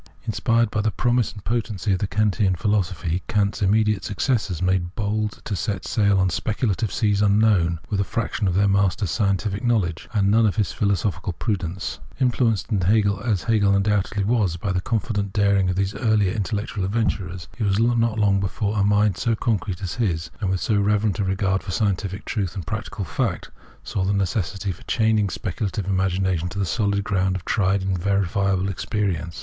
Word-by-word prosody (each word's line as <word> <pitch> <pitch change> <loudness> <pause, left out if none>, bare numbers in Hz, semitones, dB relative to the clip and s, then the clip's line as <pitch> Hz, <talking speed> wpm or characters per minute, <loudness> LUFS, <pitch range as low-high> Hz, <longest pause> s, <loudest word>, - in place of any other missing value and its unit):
Inspired 115 -1 +1
by 105 - 0
the 110 - +1
promise 120 +2 +1
and 105 -3 -12
potency 110 -4 -1
of 95 - 0
the 100 - -1
Kantian 100 -1 +1
philosophy, 90 -3 -1
Kant's 105 0 0
immediate 105 +1 +2
successors 105 - -1
made 90 -1 0
bold 105 0 -2
to 105 - -2
set 100 -3 -3
sail 100 -3 +2
on 95 -1 +2
speculative 110 +3 -1
seas 105 -2 +1
unknown, 100 -5 +3
with 100 - -1
a - - +3
fraction 110 0 -2
of 90 - 0
their 100 +2 +3
master's 100 -2 +1
scientific 100 0 0
knowledge 100 -9 0
and 100 -3 +2
none 110 +1 +4
of 100 - 0
his 105 -8 0
philosophical 100 -2 -1
prudence. 95 -1 -3 0.2
Influenced 120 -4 +1
as 100 +1 +2
Hegel 105 -4 +3
undoubtedly 100 0 +1
was 100 -5 +1
by 95 +3 -2
the 90 -1 0
confident 100 -2 -2
daring 100 -3 +3
of 90 - 0
these 95 +1 0
earlier 105 -5 +1
intellectual 105 -1 -2
adventurers, 95 -4 -2
it - - 0
was 100 -1 +2
not 115 -1 +2
long 100 -2 +3
before 100 +2 -1
a - - +3
mind 105 -2 +3
so 115 +4 +1
concrete 100 -4 -2
as 90 - -3
his, 85 -8 -1
and 100 -3 -1
with 95 -1 -1
so 110 - +1
reverent 105 +1 +1
a - - +2
regard 95 0 0
for - - -11
scientific 95 0 -1
truth 100 -6 -2
and 95 -5 -5
practical 110 0 -4
fact, - - -2 0.3
saw 95 - -2
the 100 +2 +1
necessity 100 - -1
for 85 - -10
chaining 110 -3 +2
speculative 100 +1 -3
imagination 95 -2 0
to 90 - -8
the 100 - +1
solid 100 +1 0
ground 95 -2 0
of 90 - -6
tried 95 -1 +1
and 95 -1 -1
verifiable 95 0 +1
experience. 95 -4 -2
100 Hz, 180 wpm, -23 LUFS, 95-110 Hz, 0.3 s, none